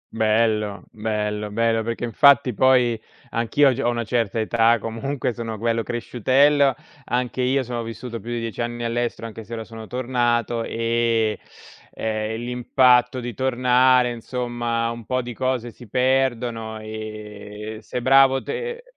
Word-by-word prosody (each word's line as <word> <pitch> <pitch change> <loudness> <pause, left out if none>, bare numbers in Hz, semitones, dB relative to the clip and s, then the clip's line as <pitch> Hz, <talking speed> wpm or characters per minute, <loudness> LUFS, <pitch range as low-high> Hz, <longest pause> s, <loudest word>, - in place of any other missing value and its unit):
Bello, 110 -2 +1
bello, 105 -1 -2
bello, 115 +1 +1
perché 115 +1 -4
infatti 135 +1 +4
poi 125 -2 +3 0.3
anch'io 130 +4 +3
g 125 - -7
ho 120 - +2
una 120 -1 -1
certa 115 -2 -1
età, 115 +1 +3
comunque 120 +4 -3
sono 115 -1 -5
quello 115 +1 0
cresciutello, 135 +4 +2 0.3
anche 125 +1 -1
io 130 +2 +2
sono 120 -1 -4
vissuto 115 +1 -6
più 120 - -9
di 120 - -2
10 115 0 -4
anni 120 0 -3
all'estero 115 0 -2
anche 110 0 -8
se 115 +3 -10
ora 115 - -4
sono 110 -1 -10
tornato, 120 -2 0
e, 115 -1 0 0.5
ehm, 110 0 -2
l'impatto 125 0 +3
di 120 0 -5
tornare 125 0 +3
insomma, 120 -1 -2
un 115 0 -7
po' 130 -1 0
di 120 - -6
cose 125 -1 -2
si 120 -2 -15
perdono 120 -3 0
e 110 0 -8
sei 125 - -5
bravo 135 +1 +5
te 475 +1 -5
120 Hz, 145 wpm, -23 LUFS, 110-125 Hz, 0.5 s, bravo